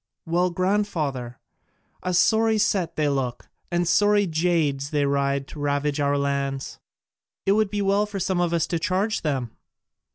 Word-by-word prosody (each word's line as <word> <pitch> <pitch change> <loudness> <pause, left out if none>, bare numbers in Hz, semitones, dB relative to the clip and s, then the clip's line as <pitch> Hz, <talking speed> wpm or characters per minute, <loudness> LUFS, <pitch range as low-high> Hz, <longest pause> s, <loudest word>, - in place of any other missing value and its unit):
"Well, 175 +2 +1
grandfather, 170 - -1 0.6
a 180 -1 -1
sorry 220 +3 +3
set 200 -5 0
they 155 -1 +1
look, 135 -4 -2 0.2
and 175 0 0
sorry 205 +3 +4
jades 160 -5 0
they 145 -2 +1
ride 140 0 0
to 150 - -9
ravage 145 0 0
our 145 0 +1
lands! 140 -1 -2 0.7
It 195 - +3
would 215 0 +2
be 205 0 -1
well 200 +2 +2
for 205 -1 -5
some 185 -1 0
of 175 -1 +1
us 170 -2 +1
to 170 - -2
charge 195 +6 0
them!" 135 -7 -2
165 Hz, 160 wpm, -24 LUFS, 140-195 Hz, 0.7 s, sorry